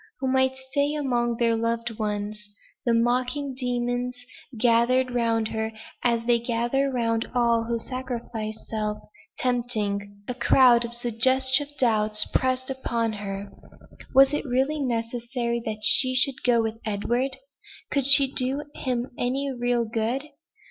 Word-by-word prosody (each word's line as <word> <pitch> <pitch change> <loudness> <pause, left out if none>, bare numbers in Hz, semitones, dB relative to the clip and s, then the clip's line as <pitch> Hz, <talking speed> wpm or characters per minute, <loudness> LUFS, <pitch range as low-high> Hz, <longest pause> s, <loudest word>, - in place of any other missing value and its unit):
who 265 - -2
might 260 0 +2
stay 285 +1 +1
among 240 -5 0
their 230 -1 +2
loved 230 0 -2
ones. 210 0 -4 0.4
The 235 - +4
mocking 250 +4 0
demons 245 -1 -2 0.4
gathered 245 +2 +3
round 230 -2 0
her, 220 0 -3 0.3
as 235 -1 +1
they 240 -1 +3
gather 240 +4 0
round 230 -3 -1
all 235 -1 +2
who 235 0 -1
sacrifice 235 -3 -6
self, 210 -1 -2 0.4
tempting. 205 -5 -2
A 250 - -2
crowd 245 -1 +5
of 235 - -6
suggestive 260 +4 +2
doubts 215 -3 +2
pressed 260 0 0
upon 235 -4 -2
her. 200 -1 -6 0.6
"Was 270 +1 +7
it 295 - -1
really 270 +3 0
necessary 235 -1 -2
that 215 -1 -4
she 255 +2 +6
should 265 0 +3
go 235 -2 +3
with 225 0 -4
Edward? 240 +6 -1 0.5
Could 275 -2 +1
she 275 -1 +6
do 265 +3 0
him 245 -2 -2
any 270 +3 -1
real 245 -1 0
good? 230 +6 -2
240 Hz, 135 wpm, -25 LUFS, 225-260 Hz, 0.6 s, Was